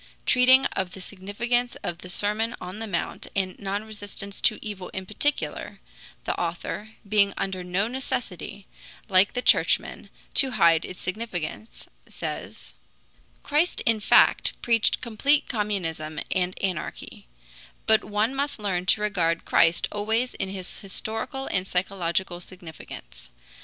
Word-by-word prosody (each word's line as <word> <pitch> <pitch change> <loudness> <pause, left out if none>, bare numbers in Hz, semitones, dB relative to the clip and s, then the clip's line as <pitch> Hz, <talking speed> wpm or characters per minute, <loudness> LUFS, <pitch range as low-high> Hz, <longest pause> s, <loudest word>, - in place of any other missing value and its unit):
Treating 260 +1 +6
of 185 -1 -1
the - - -8
significance 215 +6 -1
of 170 0 -3
the 180 - -9
Sermon 210 +5 0
on 180 +3 -7
the 225 - -4
Mount 175 -4 -3
and 190 -2 0
non 200 +1 -2
resistance 205 -2 -7
to 215 - +4
evil 200 -4 -6
in 190 0 -3
particular, 290 +9 -1 0.4
the - - -1
author, 175 +5 -3
being 200 -1 +3
under 190 -2 -2
no 180 +4 0
necessity, 215 -5 -4 0.4
like 190 +1 +5
the 250 - -2
Churchmen, - - +3 0.2
to 265 -2 +5
hide 165 -4 +5
its 180 - -8
significance, 190 0 -5 0.2
says: - - -6 0.7
"Christ 305 +5 +1
in 225 -1 +2
fact - - +4
preached 230 -2 +3
complete 275 +5 +2
communism 165 - -2
and 185 0 0
anarchy; 185 - -4 0.6
but 220 0 +4
one 215 +4 0
must 280 +1 -1
learn 185 -4 -2
to 210 - +4
regard 175 -6 +1
Christ 165 +1 +4
always 220 +4 0
in 195 - -3
his 190 -2 -6
historical 220 +7 -4
and 185 0 0
psychological 180 -1 -1
significance. 170 - -11
200 Hz, 135 wpm, -26 LUFS, 180-225 Hz, 0.7 s, Treating